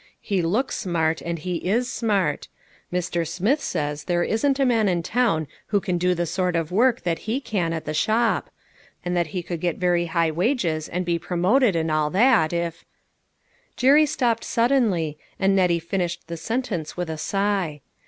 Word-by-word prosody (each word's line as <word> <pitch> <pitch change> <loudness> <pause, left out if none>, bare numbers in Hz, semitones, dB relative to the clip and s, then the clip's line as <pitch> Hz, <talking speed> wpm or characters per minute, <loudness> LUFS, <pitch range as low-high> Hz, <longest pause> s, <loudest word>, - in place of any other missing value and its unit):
He 195 -4 -1
looks 215 +11 0
smart, 165 -5 0
and 170 0 -3
he 175 +2 -3
is 225 +9 0
smart. 210 -6 0 0.4
Mr. 175 -1 -1
Smith 205 - 0
says 150 -3 -3
there 175 -1 +1
isn't 270 +8 +1
a 270 - +3
man 225 -5 +3
in 175 -2 0
town 215 -8 +1 0.2
who 205 - +2
can 180 -2 -2
do 180 +1 +2
the 175 0 -1
sort 180 +1 -1
of 165 -1 -1
work 240 +5 +3
that 170 -3 -1
he 245 +5 +1
can 190 -11 -2
at 165 -1 -4
the 155 - -3
shop, 220 +8 +1 0.6
and 180 0 -1
that 175 -2 +1
he 175 +3 -4
could 170 -1 -5
get 175 -2 -1
very 175 -1 +1
high 165 -1 +1
wages 170 - 0
and 180 +1 -2
be 170 -1 0
promoted 190 +6 +2
and 160 -1 0
all 155 -1 +1
that, 205 -3 +4
if" 170 -1 -3 0.9
Jerry 290 +4 +5
stopped 235 -5 0
suddenly, 220 - +1 0.2
and 195 0 +3
Nettie 180 -3 +3
finished 175 +1 -3
the 170 - -6
sentence 200 -5 -3
with 180 -1 -2
a 160 -1 -5
sigh. 195 -5 -1
180 Hz, 185 wpm, -23 LUFS, 165-220 Hz, 0.9 s, Jerry